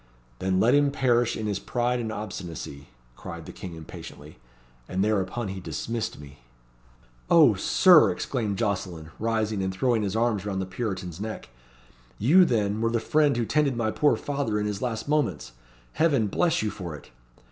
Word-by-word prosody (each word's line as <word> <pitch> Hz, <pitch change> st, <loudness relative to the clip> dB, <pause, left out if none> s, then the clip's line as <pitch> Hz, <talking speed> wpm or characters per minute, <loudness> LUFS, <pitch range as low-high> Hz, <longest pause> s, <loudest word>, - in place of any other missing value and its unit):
'Then 95 Hz, 0 st, +1 dB
let 120 Hz, +5 st, +4 dB
him 145 Hz, 0 st, +4 dB
perish 120 Hz, -4 st, +1 dB
in 110 Hz, -, -4 dB
his 100 Hz, -2 st, -1 dB
pride 125 Hz, 0 st, -1 dB
and 110 Hz, -2 st, -3 dB
obstinacy,' 85 Hz, -9 st, -7 dB, 0.3 s
cried -, -, -8 dB
the -, -, -8 dB
King 90 Hz, -3 st, -8 dB
impatiently. 75 Hz, -2 st, -11 dB, 0.5 s
And 95 Hz, +1 st, 0 dB
thereupon 105 Hz, +1 st, -1 dB
he 95 Hz, 0 st, -5 dB
dismissed 100 Hz, +7 st, -4 dB
me." 70 Hz, 0 st, -13 dB, 0.9 s
"O -, -, +7 dB
Sir!" -, -, +6 dB
exclaimed 105 Hz, -5 st, -2 dB
Jocelyn, 90 Hz, -7 st, -3 dB
rising 110 Hz, -2 st, 0 dB
and 95 Hz, 0 st, -1 dB
throwing, 115 Hz, +4 st, +1 dB
his 100 Hz, -1 st, -2 dB
arms 110 Hz, -4 st, +1 dB
round 100 Hz, -2 st, -3 dB
the 95 Hz, -, -2 dB
Puritan's 95 Hz, -3 st, -5 dB
neck; 110 Hz, -, -6 dB, 0.7 s
"you, 175 Hz, -, +6 dB
then, 105 Hz, -5 st, 0 dB
were 115 Hz, -, +2 dB
the 115 Hz, 0 st, 0 dB
friend 145 Hz, +3 st, +2 dB
who 120 Hz, -, 0 dB
tended 145 Hz, -1 st, +1 dB
my 110 Hz, -2 st, 0 dB
poor 145 Hz, +5 st, +3 dB
father 140 Hz, -7 st, -2 dB
in 105 Hz, -, -1 dB
his 105 Hz, -1 st, -3 dB
last 115 Hz, -2 st, -3 dB
moments. 140 Hz, -, 0 dB, 0.4 s
Heaven 145 Hz, -8 st, +2 dB
bless 165 Hz, -, +1 dB
you 105 Hz, -, -1 dB
for 90 Hz, -5 st, -6 dB
it!" 75 Hz, -, -14 dB
110 Hz, 170 wpm, -26 LUFS, 95-120 Hz, 0.9 s, O